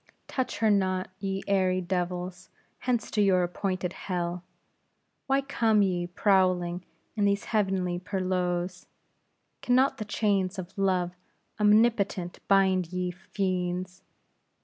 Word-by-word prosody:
Touch 260 -5 -2
her 220 0 +3
not, 185 -2 +1
ye 195 -1 -3
airy 185 -2 +2
devils; 180 0 -3 0.3
hence 245 -3 -1
to 210 - +1
your 190 -3 +4
appointed 185 0 -2
hell! 175 -1 -3 0.8
why 270 0 +3
come 225 -6 +2
ye 175 -2 0
prowling 180 -2 +2 0.3
in 205 -2 +1
these 200 0 +1
heavenly 190 -5 0
perlieus? 180 -1 -2 0.7
Can 245 - +2
not 265 +2 +3
the 215 - -3
chains 200 -2 0
of 185 -1 -7
Love 185 -3 +1 0.5
omnipotent 210 -4 +2
bind 190 -3 +3
ye, 180 0 -2
fiends?" 180 -1 -3
185 Hz, 120 wpm, -28 LUFS, 180-205 Hz, 0.8 s, your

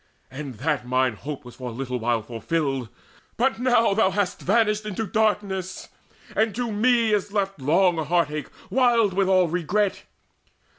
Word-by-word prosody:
And 135 -1 -7
that 145 +3 -1
mine 130 -1 +2
hope 140 +5 -7
Was 120 - -11
for 125 -1 -5
a - - -8
little 125 0 -4
while 115 -1 0
fulfilled; 135 +2 -2 0.5
but 255 0 +1
now 240 -4 +3
Thou 195 -2 +3
hast 195 -1 -1
vanished 210 +1 +2
into 215 +1 -3
darkness, 200 -4 -1 0.5
and 220 -1 +1
to 240 -1 -2
me 230 +1 +3
Is 205 -1 0
left 195 -6 -2
long 170 +3 +3
heart 170 -1 +1
ache 150 -1 -5 0.2
wild 235 -6 +3
with 195 0 +1
all 185 -2 +4
regret. 180 +4 -1
185 Hz, 160 wpm, -24 LUFS, 140-215 Hz, 0.5 s, all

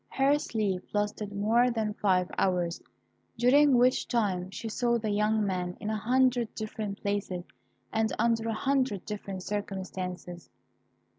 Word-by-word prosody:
Her 275 +2 +3
sleep 200 -8 -1
lasted 210 0 -1
more 220 +5 +3
than 220 -3 -1
five 185 -3 +2
hours, 180 -2 0 0.6
during 265 +3 +5
which 250 +1 +3
time 190 -6 0
she 210 +4 -6
saw 235 +2 +1
the 215 -2 -2
young 210 +1 +2
man 180 -2 -2
in 215 - -3
a - - 0
hundred 245 +1 +2
different 215 -2 -4
places, 200 -3 -2 0.5
and 220 0 +1
under 230 0 +1
a - - 0
hundred 260 -5 0
different 200 -3 -5
circumstances. 185 - -5
210 Hz, 140 wpm, -29 LUFS, 195-235 Hz, 0.6 s, during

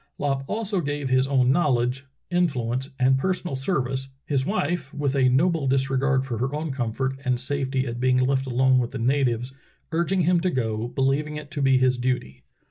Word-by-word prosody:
Lopp 135 -2 -1
also 210 -2 -1
gave 145 -2 -3
his 130 +1 +3
own 130 -2 +3
knowledge, 130 -3 +1 0.2
influence, 135 -7 0
and 130 +1 +3
personal 180 -2 -1
service, 130 -2 -1 0.2
his 135 -2 0
wife, 170 -7 -1
with 145 -2 -1
a 130 -2 +4
noble 155 +2 +2
disregard 135 0 +1
for 120 -4 -4
her 135 +4 -1
own 155 0 -3
comfort 130 +1 -2
and 125 -3 0
safety 135 0 -1
at 120 -1 -5
being 130 0 +3
left 135 +1 +1
alone 130 +1 +3
with 120 -2 -1
the - - -6
natives, 125 0 0 0.4
"urging 170 +3 +1
him 175 +1 +3
to 185 +2 0
go, 115 -6 -2
believing 135 +4 0
it 150 -1 -8
to 145 - -3
be 135 -1 +4
his 130 -1 +2
duty." 120 - -2
135 Hz, 185 wpm, -24 LUFS, 130-145 Hz, 0.4 s, a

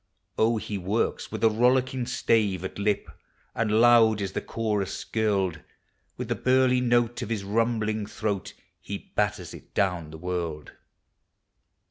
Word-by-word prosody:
Oh, 115 +1 +2
he 105 -2 -4
works 100 +5 -1
with - - -5
a 115 - +7
rollicking 125 +2 +2
stave 105 -7 +1
at 95 - -6
lip, 105 0 0 0.5
And 110 -1 +1
loud 115 -2 +6
is 100 -2 -3
the - - -3
chorus 105 -4 -2
skirled; 100 -6 0 0.6
With - - -4
the - - 0
burly 130 0 +3
note 120 -1 +1
of - - -4
his 110 -4 -2
rumbling 110 0 0
throat 105 -2 -3 0.2
He 100 -1 -8
batters 105 -4 -1
it - - -14
down 90 -5 0
the 80 - -9
world. 85 -3 -4
105 Hz, 145 wpm, -26 LUFS, 95-115 Hz, 0.6 s, a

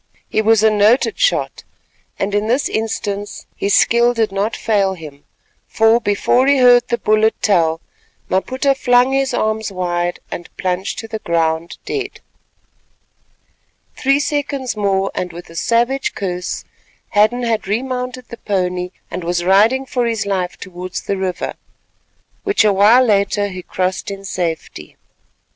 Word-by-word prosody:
He 215 - 0
was 220 0 +3
a 220 - +5
noted 215 +4 +3
shot, - - 0 0.5
and 200 +1 -2
in 205 +1 0
this 255 +4 +1
instance 205 -2 -3
his 200 0 +1
skill 240 +1 +4
did 225 -3 +1
not 200 +3 -1
fail 200 -3 +1
him; 150 -4 -12 0.4
for, 225 +1 +3
before 240 +4 +2
he 280 0 +4
heard 245 -1 +5
the 235 - 0
bullet 215 0 +2
tell, 165 -5 +2 0.5
Maputa 260 +8 +1
flung 250 -1 +3
his 270 -1 +1
arms 220 -3 -1
wide 175 -1 -2
and 175 - -6
plunged 185 +1 -2
to 225 - -6
the 220 0 -5
ground 165 -2 -1
dead. 400 -2 -4 1.8
Three 275 +1 +2
seconds 285 -4 -2
more, 195 -2 0
and 180 -1 -3
with 170 0 -11
a - - -13
savage 240 +8 0
curse, 180 -3 -4 0.4
Hadden 215 +4 +2
had 225 -3 -1
remounted 250 +3 -3
the 235 - -8
pony 180 -4 -2 0.2
and 185 - -4
was 175 +1 -1
riding 220 +8 +4
for 245 -2 -1
his 225 -3 -1
life 185 -3 -2
towards 185 0 -7
the 200 - -2
river, 190 -2 -3 0.9
which 405 - +2
a 210 - +4
while 220 +6 +5
later 205 -1 +1
he 185 -1 -7
crossed 185 +2 -2
in 195 0 -7
safety. 165 - -4
210 Hz, 150 wpm, -18 LUFS, 185-245 Hz, 1.8 s, a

